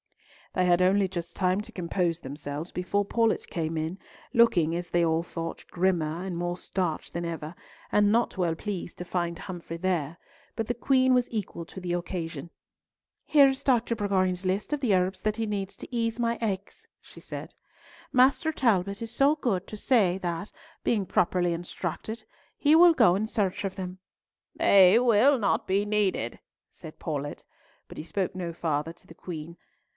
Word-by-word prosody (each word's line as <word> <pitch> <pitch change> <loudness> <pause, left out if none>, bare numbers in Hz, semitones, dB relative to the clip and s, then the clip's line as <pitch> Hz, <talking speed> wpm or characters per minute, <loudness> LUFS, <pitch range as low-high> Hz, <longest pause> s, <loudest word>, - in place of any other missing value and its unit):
They 185 - +2
had 175 0 +4
only 190 +2 +4
just 170 -2 -6
time 185 +1 +1
to - - -11
compose 175 -1 -1
themselves 145 +3 -6
before 200 +3 -1
Paulett 225 +2 +1
came 165 -1 -2
in, 160 +5 -3 0.3
looking, 175 - +4
as 175 0 -4
they 175 -1 +2
all 165 0 +1
thought, 165 -1 -6
grimmer 175 -2 0
and 185 -2 -4
more 175 +1 -2
starched 180 -4 -3
than 170 - -3
ever, 165 0 -5 0.4
and 205 0 +4
not 235 +2 +2
well 170 -3 +1
pleased 185 -1 -5
to 180 - -6
find 175 -1 -2
Humfrey 175 -3 -7
there, 170 -3 -1 0.4
but 225 -2 -2
the 240 - 0
Queen 260 +1 +3
was 250 -1 +2
equal 205 -6 -4
to 190 - -10
the 180 -1 -3
occasion. 175 -1 -4 0.7
"Here 285 -2 +6
is 270 0 -2
Dr. 240 -3 +2
Bourgoin's 185 -3 0
list 195 +9 -1
of 295 - -1
the 235 -7 +2
herbs 185 0 +1
that 215 0 -1
he 225 - -1
needs 200 -2 -4
to - - -9
ease 230 0 -1
my 235 0 +1
aches," 200 -3 -4
she - - -15
said. - - -8 0.6
"Master 265 +5 +4
Talbot 200 - +1
is 230 -1 -5
so 275 +5 +3
good 235 -11 0
as - - -31
to 215 - -7
say 205 -7 +3
that, 175 +1 -4 0.3
being 210 -4 +1
properly 175 -1 +1
instructed, 175 +6 -5 0.3
he 300 +1 +4
will 345 +1 +8
go 180 - +5
in 215 +3 -1
search 205 -5 -1
of 195 -1 -3
them." 185 -1 -6 0.6
"They 195 +1 +6
will 250 +3 +5
not 215 - +1
be 195 +2 +1
needed," 205 - 0 0.3
said 155 - -12
Paulett, 145 -2 -4 0.4
but - - -12
he - - -5
spoke 185 +3 -2
no 175 -2 -3
farther 160 -2 -2
to 170 - -20
the - - -12
Queen. 165 -1 -7
185 Hz, 180 wpm, -27 LUFS, 170-215 Hz, 0.7 s, will